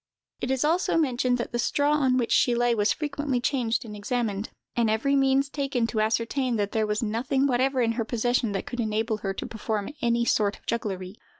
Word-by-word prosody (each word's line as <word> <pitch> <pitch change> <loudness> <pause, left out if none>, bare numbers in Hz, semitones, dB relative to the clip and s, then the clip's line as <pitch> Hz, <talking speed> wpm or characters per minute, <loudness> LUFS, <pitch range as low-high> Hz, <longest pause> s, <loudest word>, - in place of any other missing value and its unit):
It 245 - -3
is 265 +2 +1
also 330 +2 +2
mentioned 255 -5 +1
that 240 - -4
the 240 - -2
straw 285 +5 +1
on 265 -4 +3
which 240 -2 0
she 245 - +4
lay 240 0 +2
was 210 -2 +2
frequently 290 -3 -1
changed 245 -3 0
and 210 -2 -8
examined, 210 -1 -2 0.3
and 235 -2 +2
every 235 +6 +1
means 270 0 +3
taken 275 -4 -1
to 225 -1 -1
ascertain 230 +3 0
that 205 -1 -1
there 220 -1 0
was 210 +2 -1
nothing 245 +5 0
whatever 260 0 +2
in 230 - +2
her 230 0 -1
possession 240 0 0
that 195 - -3
could 245 - -6
enable 220 0 0
her 195 -2 -3
to - - -4
perform 215 0 -3
any 235 0 +2
sort 205 -3 +1
of - - -27
jugglery. 195 -4 -3
240 Hz, 210 wpm, -26 LUFS, 220-265 Hz, 0.3 s, she